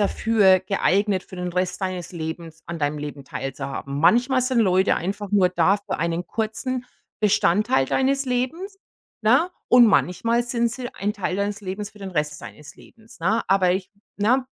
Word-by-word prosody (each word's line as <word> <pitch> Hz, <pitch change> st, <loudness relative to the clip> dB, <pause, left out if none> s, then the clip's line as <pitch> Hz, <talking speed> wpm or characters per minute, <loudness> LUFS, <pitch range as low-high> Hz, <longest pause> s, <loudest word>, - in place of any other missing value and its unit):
dafür 205 Hz, -2 st, +4 dB
geeignet 195 Hz, 0 st, +1 dB
für 185 Hz, -, -12 dB
den 180 Hz, 0 st, -4 dB
Rest 180 Hz, +2 st, -1 dB
deines 185 Hz, -2 st, -4 dB
Lebens 165 Hz, -1 st, -7 dB
an 170 Hz, -1 st, -6 dB
deinem 145 Hz, +1 st, -1 dB
Leben 145 Hz, -1 st, -6 dB
teilzuhaben. 135 Hz, +1 st, -5 dB
Manchmal 245 Hz, -, +4 dB
sind 255 Hz, -1 st, +1 dB
Leute 190 Hz, -3 st, +3 dB
einfach 195 Hz, +3 st, -4 dB
nur 195 Hz, -3 st, +4 dB
da 180 Hz, +2 st, +3 dB
für 200 Hz, -, -5 dB
einen 170 Hz, +2 st, -2 dB
kurzen 240 Hz, +5 st, -3 dB, 0.4 s
Bestandteil 205 Hz, -8 st, +3 dB
deines 270 Hz, -, +1 dB
Lebens, 315 Hz, +11 st, -3 dB, 0.4 s
ne? 260 Hz, +11 st, +4 dB, 0.2 s
Und 245 Hz, -1 st, +7 dB
manchmal 230 Hz, +4 st, +2 dB
sind 235 Hz, -1 st, 0 dB
sie 245 Hz, 0 st, -5 dB
ein 205 Hz, +1 st, -2 dB
Teil 190 Hz, -3 st, -3 dB
deines 200 Hz, +1 st, -2 dB
Lebens 200 Hz, +2 st, -5 dB
für 210 Hz, -, -18 dB
den 195 Hz, -1 st, -7 dB
Rest 150 Hz, -1 st, -2 dB
deines 150 Hz, -2 st, -11 dB
Lebens, 225 Hz, -4 st, -18 dB
ne?“ 215 Hz, +7 st, +1 dB
Aber 185 Hz, -2 st, +3 dB
ich 185 Hz, 0 st, -3 dB, 0.3 s
ne, 250 Hz, +6 st, +2 dB
195 Hz, 170 wpm, -23 LUFS, 175-230 Hz, 0.4 s, Und